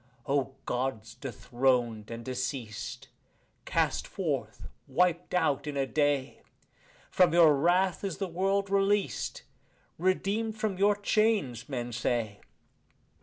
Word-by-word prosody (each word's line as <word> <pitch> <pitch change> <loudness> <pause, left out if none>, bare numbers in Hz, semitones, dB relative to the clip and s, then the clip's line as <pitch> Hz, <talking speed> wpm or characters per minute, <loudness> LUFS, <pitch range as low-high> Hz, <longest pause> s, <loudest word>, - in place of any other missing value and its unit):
O 135 -2 0
Gods 125 -3 -2
dethroned 120 -3 -1
and 115 0 -7
deceased, 125 -4 -4 0.6
cast - - 0
forth, - - -3 0.2
wiped 180 0 +1
out 150 -4 +1
in 145 -1 -3
a 135 - +2
day! 145 -1 0 0.7
From 180 -2 +4
your 165 -4 +7
wrath 175 +6 +2
is 195 -4 -3
the 195 - -2
world 195 +3 0
released, 200 - +1 0.6
redeemed 205 +4 0
from 215 -4 -2
your 205 +1 +4
chains, 205 - +1
men 120 -3 -3
say. 115 -3 -1
150 Hz, 115 wpm, -29 LUFS, 125-195 Hz, 0.7 s, your